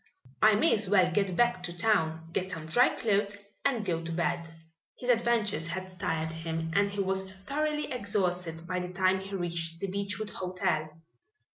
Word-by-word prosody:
"I 215 -1 +7
may 210 - +4
as 205 -3 0
well 185 -3 +5
get 195 0 +1
back 240 -4 +3
to 175 -1 -4
town, 165 -6 +1
get 185 +1 -1
some 165 -4 -5
dry 240 +11 +5
clothes, 205 -2 +1 0.3
and 245 -6 +1
go 170 -3 0
to 165 0 -4
bed." 170 0 -1 0.5
His 250 - -3
adventures 230 -8 +2
had 185 +2 -3
tired 160 -1 -1
him 165 0 -3
and 200 +2 +3
he 200 0 -2
was 190 0 -1 0.2
thoroughly 300 +3 -1
exhausted 180 -7 -1
by 180 +1 -2
the 180 0 -4
time 185 +1 +2
he 195 +1 -6
reached 170 -2 -3
the - - -2
Beechwood 200 +2 -3
Hotel. 180 -4 -1
185 Hz, 175 wpm, -30 LUFS, 170-205 Hz, 0.5 s, I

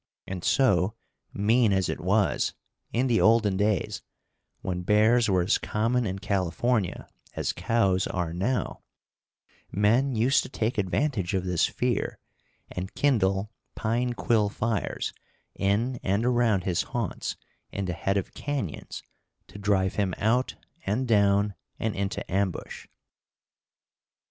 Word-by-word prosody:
And 90 -2 -6
so, 110 -6 +3 0.4
mean 110 +2 +3
as 95 -1 +2
it - - -3
was, 100 +4 +1 0.4
in 125 +3 +1
the 120 -3 +2
olden 110 -3 +4
days, 105 -2 0 0.6
when 90 -1 -3
bears 110 +4 +4
were 90 -2 +3
as 95 - +2
common 115 +2 0
in 95 +1 -3
California 100 +1 -1 0.3
as - - -1
cows 95 -1 +1
are 85 -2 -2
now, 115 +9 -1 0.9
men 115 +7 +2
used 120 +5 +3
to - - -8
take 115 -3 -1
advantage 100 - 0
of 95 - 0
this 90 -2 +2
fear - - -1 0.5
and 90 +1 -5
kindle 105 -7 +2 0.2
pine 120 +3 0
quill 110 -4 +2
fires 110 +1 -2 0.4
in 110 +6 0
and 100 +4 0
around 120 -6 +2
his 90 0 +1
haunts 120 -6 -3 0.4
in 100 - -3
the 90 - -2
head 95 +4 0
of 95 - -3
canyons 140 - -4 0.5
to 100 - -10
drive 100 -2 +1
him 100 -3 0
out 120 +4 +1 0.3
and 115 +6 -1
down 100 -2 +3 0.2
and 110 -1 -2
into 100 0 -2
ambush. 95 -1 -2
105 Hz, 130 wpm, -27 LUFS, 95-115 Hz, 0.9 s, olden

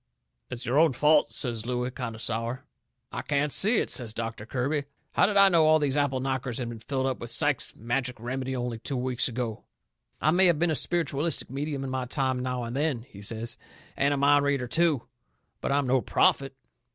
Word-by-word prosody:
"It's 125 0 -5
your 130 +5 +2
own 160 -4 +5
fault," 150 +4 +4
says 115 -4 -3
Looey, 125 0 -1
kind 120 -3 -5
o' - - -9
sour. 115 +2 -3 0.5
"I - - -4
can't 145 0 0
see 215 - +3
it," - - 0
says 115 -5 -2
Doctor 115 -2 -5
Kirby. 140 +4 -1 0.3
"How - - +4
did 205 -1 0
I 200 0 +8
know 170 -4 +4
that 155 - +5
all 155 0 +6
these 145 -3 0
apple 145 -3 +1
knockers 130 -2 -2
had 120 -2 -3
been 115 -1 -7
filled 130 +4 -2
up 130 -1 -1
with 120 - -7
Sykes's - - 0
Magic 120 +2 -2
Remedy 130 +3 -3
only 120 -2 -3
two 135 +3 -3
weeks 125 0 0
ago? 120 -3 -4 0.6
I 155 - +3
may 185 +2 +6
have 170 -3 +4
been 170 +1 +2
a - - +1
spiritualistic 160 -3 0
medium 140 0 -3
in 135 - -4
my 130 -1 -2
time 130 0 -1
now 125 -1 -2
and 115 +1 -5
then," 140 -5 0
he 100 -5 -13
says, 115 +3 -4 0.4
"and 140 +1 +2
a 145 - +1
mind 145 +1 +4
reader, 140 -3 0
too, 160 -2 +2 0.6
but - - -1
I'm 140 0 +2
no 130 0 +2
prophet." 135 +2 +2
130 Hz, 215 wpm, -27 LUFS, 120-145 Hz, 0.6 s, I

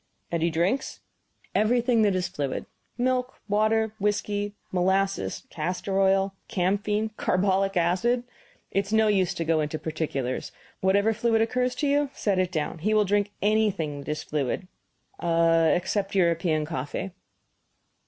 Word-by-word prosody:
"And 170 -1 -1
he 170 - +2
drinks 175 - -1 0.3
" - - -35
"Everything 235 +2 +3
that 205 -3 +3
is 185 -1 0
fluid. 140 -2 -3 0.3
Milk, 255 0 0
water, 215 +1 +2
whisky, 205 0 -1 0.2
molasses, 190 +2 0
castor 180 +4 -2
oil, 195 0 +3
camphene, 205 +4 0
carbolic 195 +1 +1
acid 190 +9 +2 0.5
it 195 0 0
is - - -8
no 220 0 +4
use 190 -4 +2
to 165 - -2
go 160 0 +2
into 150 +1 -2
particulars; 150 -5 -3 0.3
whatever 200 +3 +3
fluid 225 0 +2
occurs 250 +2 0
to 295 - -1
you 285 0 +2
set 200 -3 0
it 185 -1 +1
down. 160 0 -2
He 215 +6 +1
will 210 -1 +4
drink 205 +1 +1
anything 205 -9 +1
that 140 - -8
is 155 +1 -2
fluid, 150 +5 -2 0.5
except 170 +4 +2
European 165 -3 +2
coffee." 150 +5 -4
195 Hz, 145 wpm, -26 LUFS, 170-215 Hz, 0.5 s, no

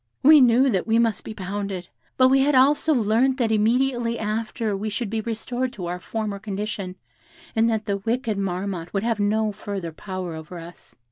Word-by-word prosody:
"We 300 +1 +8
knew 250 +2 +5
that 190 -1 -1
we 225 0 +3
must 230 -2 +1
be 220 - -7
pounded; 195 -2 -4 0.3
but 255 0 +6
we 270 +1 +4
had 280 +1 +3
also 285 +4 +4
learnt 245 +1 +2
that 235 -4 +1
immediately 235 +2 +1
after 220 0 -2
we 210 +2 -3
should 210 0 -3
be 225 -1 -1
restored 240 +3 -3
to 185 -7 -6
our 175 +1 -4
former 210 +1 -4
condition, 200 -2 -4 0.6
and 225 +1 +3
that 220 -1 -1
the 200 -1 -1
wicked 225 0 -2
Marmotte 185 -2 -3
would 195 - 0
have 230 -2 0
no 215 +1 +1
further 200 -4 -5
power 185 +1 -6
over 160 +2 -8
us. 170 +1 -12
215 Hz, 190 wpm, -24 LUFS, 195-235 Hz, 0.6 s, We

